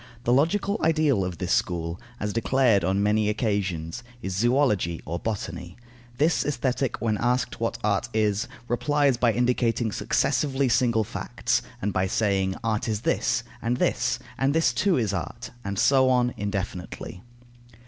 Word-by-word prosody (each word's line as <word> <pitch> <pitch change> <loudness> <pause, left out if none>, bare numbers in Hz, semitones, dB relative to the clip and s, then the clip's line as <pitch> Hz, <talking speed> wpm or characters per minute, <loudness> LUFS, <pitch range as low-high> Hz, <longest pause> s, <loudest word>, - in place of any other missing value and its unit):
The 120 - +2
logical 200 - +2
ideal 155 -9 +3
of 90 -2 -4
this - - -1
school, 85 -1 -1 0.2
as 105 -1 -2
declared 115 -3 +3
on 95 +3 +1
many 105 0 +2
occasions, 100 -4 -2 0.2
is 95 -5 -4
zoology 105 - +2
or 85 +1 -3
botany. 90 -5 -5 0.4
This 155 +4 +2
Aesthetic, 130 -2 -1
when 110 -3 0
asked 125 +1 0
what 115 0 -1
art 105 +3 0
is, 105 -2 +1 0.2
replies 140 +1 +2
by 120 -1 +3
indicating 120 -1 +1
successively 140 +3 +1
single 115 0 +3
facts, - - -1 0.2
and 100 0 0
by 95 0 +1
saying: 95 -2 +1
"Art 110 -1 -1
is 110 -2 -1
this, - - +1 0.2
and 120 +2 0
this, 120 -1 +1 0.2
and 135 +2 +2
this 160 -7 +3
too 185 - +2
is 110 -5 0
art," 95 - -5
and 100 -2 -4
so 130 +4 +4
on, 125 -1 +2
indefinitely. 95 -3 -5
115 Hz, 150 wpm, -25 LUFS, 100-130 Hz, 0.4 s, so